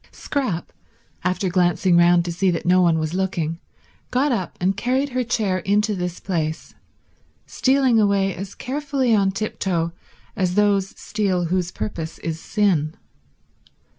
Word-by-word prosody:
Scrap, 255 - -3 0.5
after 185 +2 0
glancing 180 0 +2
round 175 0 +5
to 175 - -2
see 185 +3 +1
that 170 -2 -2
no 180 +1 +5
one 170 -2 +3
was 155 0 -2
looking, 175 -4 -1 0.5
got 270 +3 +1
up 190 -8 -2
and 190 +2 +1
carried 260 +6 0
her 255 -1 -1
chair 215 -6 0
into 210 +4 +1
this 180 -2 -3
place, 160 -4 -3 0.7
stealing 260 -3 +2
away 200 -2 +2
as 195 +1 -7
carefully 275 -2 -1
on 200 -2 +3
tiptoe 190 -4 -2 0.4
as 185 -2 0
those 200 -2 +1
steal 190 -5 -1
whose 180 -1 0
purpose 165 -6 -5
is 165 -1 -4
sin. 170 -7 +1
190 Hz, 140 wpm, -22 LUFS, 175-215 Hz, 0.7 s, round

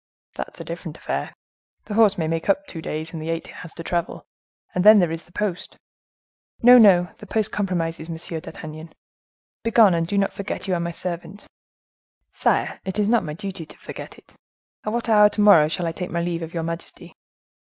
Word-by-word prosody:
"That's - - -7
a - - -5
different - - -7
affair. - - -3 0.5
The 210 - -6
horse 210 -2 +4
may 160 -2 -1
make 165 +3 -2
up 290 +9 +2
the - - -12
two 165 - -7
days, 160 +1 -5
in 165 - -5
the 155 +1 -5
eight 165 0 -2
he - - -12
has 165 - -10
to 165 - -7
travel; 170 0 -3 0.5
and 180 - 0
then 215 +1 +9
there 175 -5 +3
is 165 0 -5
the 175 - -23
post." 195 -2 -4 0.9
"No, 245 +1 +9
no, 180 -5 +6
the - - -11
post 220 -1 0
compromises, 170 -5 -2
Monsieur 165 0 -5
d'Artagnan. 155 +1 -9 0.7
Begone 230 -4 +5
and 165 -1 0
do 200 - -1
not 195 0 +1
forget 200 0 -5
you 190 - 0
are 175 - 0
my 170 0 -2
servant." 175 +3 -6 0.9
"Sire, - - 0
it 190 +1 -5
is 210 -1 +2
not 235 0 +3
my 150 - -5
duty 190 -2 -6
to 155 - -14
forget - - -9
it! - - -21 0.5
At 215 - -2
what 235 0 -2
hour 210 -2 +6
to 210 - -2
morrow 185 -8 +7
shall 170 +2 -3
I 165 - -1
take 180 +2 -5
my 170 0 -2
leave 170 -1 -2
of 165 0 -6
your 165 - -1
majesty?" 165 +1 -7
175 Hz, 215 wpm, -23 LUFS, 165-205 Hz, 0.9 s, then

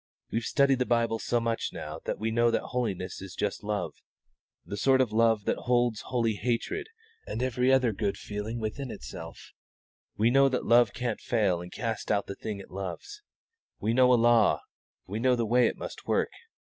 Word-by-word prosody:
We've 115 - 0
studied 140 -2 +3
the 125 - 0
Bible 115 -1 +1
so 120 - 0
much 115 -1 -1
now - - -6
that - - -2
we 110 +1 -2
know 120 +1 +3
that 115 - 0
holiness 100 -8 -3
is 95 0 -8
just 105 - -2
love 105 0 -2 0.7
the 100 - -5
sort 130 +6 +3
of 130 -4 +2
love 115 -1 +3
that - - +1
holds 120 -2 +1
holy 115 -3 +1
hatred 120 - -2 0.4
and 115 - -3
every 125 0 +2
other 130 -4 +3
good 100 0 -1
feeling 105 +3 -5
within 115 +5 -4
itself. 65 - -9 0.7
We 115 +3 +3
know 135 +1 +5
that 130 - -2
love 120 -1 +5
can't 125 -3 -2
fail 100 -7 +1
and 90 0 -9
cast 115 -1 -3
out 100 -1 +1
the - - -5
thing 105 +1 -5
it 100 - -12
loves. 100 - -6 0.6
When 110 - -1
we - - +1
know 125 +1 +5
a - - +7
law, 120 -2 +4 0.4
we 105 +4 -4
know 125 +1 +3
the 120 -1 0
way 120 +2 +4
it - - -3
must - - -8
work. - - +1
115 Hz, 195 wpm, -28 LUFS, 105-125 Hz, 0.7 s, a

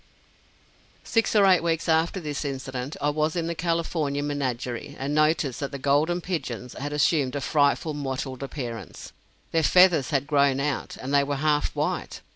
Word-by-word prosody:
Six 225 -1 +1
or 205 -2 +6
eight 185 -2 +5
weeks 165 0 -1
after 165 +3 +2
this 150 -4 -4
incident, 130 -1 -5
I 145 - +1
was 155 +2 0
in 170 -2 -1
the 170 - -2
California 165 -4 -1
Menagerie, 140 -1 -3
and 135 +2 -3
noticed 155 -3 +2
that 140 -1 -3
the 140 - -5
"Golden 145 +6 +1
Pigeons" 125 -9 -4
had 145 +2 -5
assumed 145 -2 +1
a - - -1
frightfully 145 +2 +1
mottled 135 -1 -4
appearance. 125 -5 -7 0.4
Their 165 - +2
feathers 180 -3 +5
had 140 -2 0
grown 140 -2 +2
out, 140 -1 -2
and 135 +2 -5
they 140 0 +5
were 140 0 -2
half 150 +1 0
white. - - -2
145 Hz, 170 wpm, -25 LUFS, 135-160 Hz, 0.4 s, or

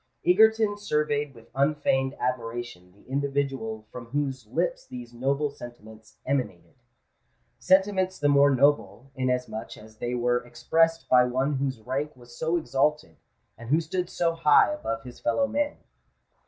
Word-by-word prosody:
Egerton 215 +2 +4
surveyed 150 -6 -1
with 115 - -17
unfeigned 135 -1 +1
admiration 120 -6 -4
the 100 +4 -24
individual 135 -5 -2
from 120 -2 -9
whose 135 -3 -3
lips - - -2
these 120 -1 -9
noble 140 +4 0
sentiments 110 -4 -13
emanated—sentiments 140 - -2
the 145 - +1
more 140 0 +5
noble, 135 -3 +1
inasmuch 125 -4 -3
as 110 0 -15
they 120 +2 -3
were 120 0 +2
expressed 165 +8 +1
by 125 -1 +6
one 130 +4 0
whose 135 -3 -2
rank 140 +6 -3
was 120 -1 -15
so 160 +5 0
exalted, 150 - 0 0.4
and 115 0 -9
who 155 +4 +4
stood 175 +2 -3
so 170 -1 0
high 165 - +5
above 115 - -4
his 125 -1 -11
fellow 280 - +1
men. 290 +1 -1
135 Hz, 140 wpm, -26 LUFS, 120-150 Hz, 0.4 s, by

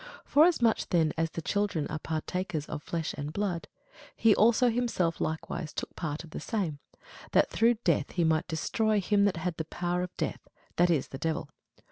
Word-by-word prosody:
Forasmuch 290 -7 +4
then 165 -4 +2
as 165 0 0
the 165 - -6
children 200 -7 0
are 155 - -4
partakers 160 0 -3
of 150 -1 -5
flesh 165 0 -3
and 145 +1 -5
blood, 185 -2 -2 0.5
he 225 -2 +5
also 235 +3 +5
himself 225 -8 0
likewise 160 -1 -3
took - - -5
part 155 -2 -4
of 165 - -13
the - - -5
same; 180 -10 -2 0.5
that - - +4
through 235 +1 +4
death 155 -5 +2
he 175 - +1
might 160 -1 +2
destroy 210 +6 +1
him 200 +1 +3
that 200 -4 +1
had 175 0 -3
the 160 - -3
power 175 +2 -2
of 180 0 -6
death, - - -3 0.3
that 175 +1 +4
is, 155 -6 +1
the 135 - -7
devil. 160 -1 -2
175 Hz, 185 wpm, -29 LUFS, 160-205 Hz, 0.5 s, he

